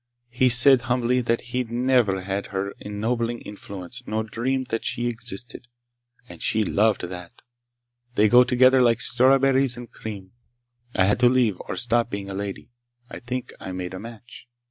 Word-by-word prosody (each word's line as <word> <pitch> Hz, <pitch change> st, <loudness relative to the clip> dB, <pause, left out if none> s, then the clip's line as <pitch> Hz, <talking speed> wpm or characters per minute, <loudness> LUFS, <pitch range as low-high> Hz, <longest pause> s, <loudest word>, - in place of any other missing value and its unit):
He 125 Hz, +1 st, +2 dB
said 125 Hz, +1 st, +7 dB
humbly 125 Hz, 0 st, 0 dB
that 115 Hz, -1 st, 0 dB
he'd 125 Hz, -2 st, -2 dB
never 120 Hz, -6 st, +1 dB
had 100 Hz, +1 st, -3 dB
her 100 Hz, 0 st, -3 dB
ennobling 115 Hz, +3 st, -3 dB
influence 100 Hz, +2 st, -9 dB
nor 110 Hz, +1 st, -1 dB
dreamed 125 Hz, +4 st, -3 dB
that 115 Hz, -, -2 dB
she 120 Hz, -, -2 dB
existed. 120 Hz, 0 st, -4 dB, 0.6 s
And -, -, -12 dB
she 110 Hz, 0 st, +1 dB
loved 110 Hz, +1 st, +1 dB
that! 90 Hz, -1 st, -9 dB, 0.7 s
They 105 Hz, -1 st, +4 dB
go 125 Hz, +3 st, +7 dB
together 130 Hz, +1 st, +4 dB
like 120 Hz, -2 st, +3 dB
strawberries 130 Hz, 0 st, +3 dB
and 120 Hz, -1 st, -10 dB
cream! 100 Hz, -4 st, -8 dB, 0.6 s
I 95 Hz, -, +3 dB
had 105 Hz, +4 st, +1 dB
to 125 Hz, -1 st, +5 dB
leave, 120 Hz, -7 st, +1 dB
or -, -, -3 dB
stop 120 Hz, -1 st, +1 dB
being 100 Hz, -2 st, -6 dB
a -, -, -5 dB
lady. 100 Hz, +3 st, -6 dB, 0.4 s
I -, -, -7 dB
think 125 Hz, +1 st, -5 dB
I 95 Hz, -, -7 dB
made 90 Hz, 0 st, -5 dB
a 95 Hz, -, -6 dB
match." 115 Hz, +2 st, -12 dB
115 Hz, 165 wpm, -24 LUFS, 100-125 Hz, 0.7 s, said